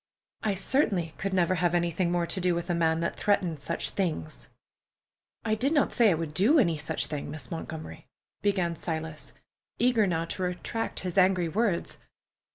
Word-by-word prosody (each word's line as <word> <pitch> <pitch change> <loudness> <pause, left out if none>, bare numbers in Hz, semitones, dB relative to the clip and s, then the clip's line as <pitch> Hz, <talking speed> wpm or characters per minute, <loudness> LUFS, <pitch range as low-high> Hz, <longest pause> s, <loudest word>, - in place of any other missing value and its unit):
I 210 -3 0
certainly 190 - +1
could 195 - -2
never 185 -1 +2
have 175 -1 +1
anything 175 0 +1
more 175 -1 +1
to 185 - 0
do 180 -1 +2
with 175 +1 -2
a - - +2
man 165 -1 +2
that - - -1
threatened 180 -6 +1
such 165 +4 -1
things." 80 - -3 1.0
"I 215 - +1
did 260 +8 +1
not 290 - +2
say 235 -3 +5
I 180 - +3
would 160 -2 -4
do 215 - +4
any 175 - +3
such 150 0 -2
thing, 150 -2 -5
Miss 145 -4 -6
Montgomery," 160 -1 -7 0.3
began 185 -4 +1
Silas, 160 -1 -5 0.5
eager 235 -4 +3
now 165 -2 0
to 185 +3 -5
retract 180 +5 -2
his 180 0 0
angry 185 -2 +3
words. 200 -1 0
175 Hz, 175 wpm, -28 LUFS, 165-195 Hz, 1.0 s, say